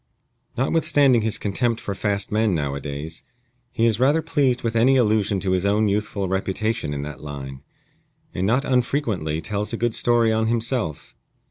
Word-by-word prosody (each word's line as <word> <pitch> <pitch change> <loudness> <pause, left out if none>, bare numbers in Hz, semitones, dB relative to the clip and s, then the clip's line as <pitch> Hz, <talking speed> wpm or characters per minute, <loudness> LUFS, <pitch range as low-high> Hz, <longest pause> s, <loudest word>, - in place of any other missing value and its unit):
Notwithstanding 135 -2 +3
his 110 -1 0
contempt 115 +3 -1
for 100 - -4
fast 100 0 -2
men 105 -3 +2
nowadays, 70 +2 -4 0.5
he 115 - +1
is 110 -1 +2
rather 145 +5 +3
pleased 140 -6 +1
with 115 -1 -2
any 130 +4 +4
allusion 105 -4 +2
to 95 - -1
his 95 -1 +1
own 105 +2 +2
youthful 100 -1 -1
reputation 95 -1 -2
in 70 -1 -3
that 75 -3 -8
line, 70 -3 -7 0.7
and 95 +2 -1
not 130 +6 +2
unfrequently 120 - 0
tells 105 +6 -3
a - - -1
good 120 0 0
story 120 -1 +3
on 110 0 +1
himself. 115 - -2
110 Hz, 160 wpm, -23 LUFS, 95-120 Hz, 0.7 s, any